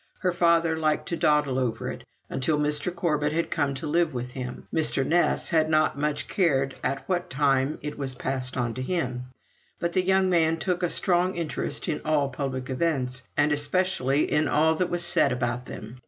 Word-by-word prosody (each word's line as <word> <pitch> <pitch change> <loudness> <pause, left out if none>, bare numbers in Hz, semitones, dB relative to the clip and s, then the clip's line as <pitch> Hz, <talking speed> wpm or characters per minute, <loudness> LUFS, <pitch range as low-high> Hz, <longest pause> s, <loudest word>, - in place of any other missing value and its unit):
Her 185 -2 +2
father 170 -1 +3
liked 155 -1 0
to 170 - -1
dawdle 150 -5 +2
over 115 -3 -2
it. - - -9 0.2
Until 135 +4 0
Mr. 150 +3 +1
Corbet 155 -4 0
had 165 +1 -1
come 145 -3 0
to 135 - -5
live 165 -1 +1
with 125 0 -4
him, 125 -1 -7
Mr. 150 -4 +2
Ness 175 +4 +1
had 160 -3 +2
not 155 0 +2
much 150 +1 -2
cared 135 -8 +1
at 135 - -2
what 180 -2 -1
time 135 +1 +1
it 150 0 -5
was 135 -2 -3
passed 130 0 -2
on 120 -2 -1
to 130 - -5
him; 130 -5 -2 0.5
but 170 0 -2
the 185 - +2
young 190 0 +3
man 165 -3 +2
took 180 +2 -1
a 175 - +1
strong 180 0 +2
interest 165 -3 -3
in 155 -4 -2
all 150 -3 +1
public 130 -1 -4
events, 130 -3 -1 0.2
and 150 0 +3
especially 150 -2 +1
in 150 +1 +2
all 160 +2 +3
that 180 +2 -1
was 175 0 0
said 175 - +3
about 120 0 -2
them. 110 +4 -9
150 Hz, 195 wpm, -26 LUFS, 135-170 Hz, 0.5 s, father